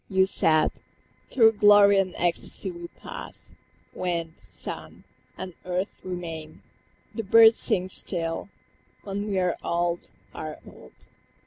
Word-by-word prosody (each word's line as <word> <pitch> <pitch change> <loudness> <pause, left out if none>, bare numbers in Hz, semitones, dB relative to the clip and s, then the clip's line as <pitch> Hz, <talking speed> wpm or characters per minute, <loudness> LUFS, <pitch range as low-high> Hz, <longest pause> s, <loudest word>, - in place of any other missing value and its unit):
You 190 -1 +4
said, 155 -4 +3 0.6
"Through 225 -4 +5
glory 205 -1 +7
and 185 -2 -1
ecstasy 175 +2 -1
we 170 0 -8
pass; - - -10 0.4
Wind, 170 -3 -3
sun, 95 -3 -6 0.3
and 185 -1 -7
earth 180 +2 -2
remain, 165 -4 -7 0.5
the 225 - -3
birds 225 +2 +7
sing 185 0 +1
still, 170 -1 -2 0.5
When 200 +1 -4
we 195 - -1
are 180 -2 +1
old, 170 0 -1 0.2
are 155 -1 -6
old. 65 - -16
180 Hz, 120 wpm, -26 LUFS, 170-200 Hz, 0.6 s, glory